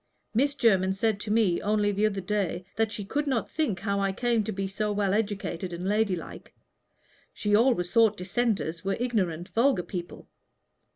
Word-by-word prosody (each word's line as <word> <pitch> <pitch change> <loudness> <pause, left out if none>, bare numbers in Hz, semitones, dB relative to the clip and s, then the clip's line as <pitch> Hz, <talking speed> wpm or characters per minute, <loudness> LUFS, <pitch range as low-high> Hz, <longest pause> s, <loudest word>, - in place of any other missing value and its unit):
Miss 280 +5 +2
Jermyn 190 -7 +3
said 210 +1 0
to 210 0 -4
me 210 -6 +2
only 210 0 +1
the 205 +2 +2
other 200 -2 -3
day 185 -2 -2
that 225 -1 +1
she 210 -2 -5
could 290 +8 -2
not 255 -5 -1
think 240 - -1
how 200 0 0
I 195 0 +1
came 235 +2 +1
to 220 - -2
be 195 -1 -3
so 210 +2 -2
well 200 -2 +1
educated 200 -4 -2
and 175 +2 -4
ladylike. 205 -4 -2 0.8
She 205 -1 -1
always 215 -7 +3
thought 225 -3 +4
Dissenters 185 -4 -1
were 195 0 -1
ignorant, 185 -9 -1
vulgar 230 -5 +2
people. 175 0 -7
205 Hz, 175 wpm, -27 LUFS, 190-225 Hz, 0.8 s, thought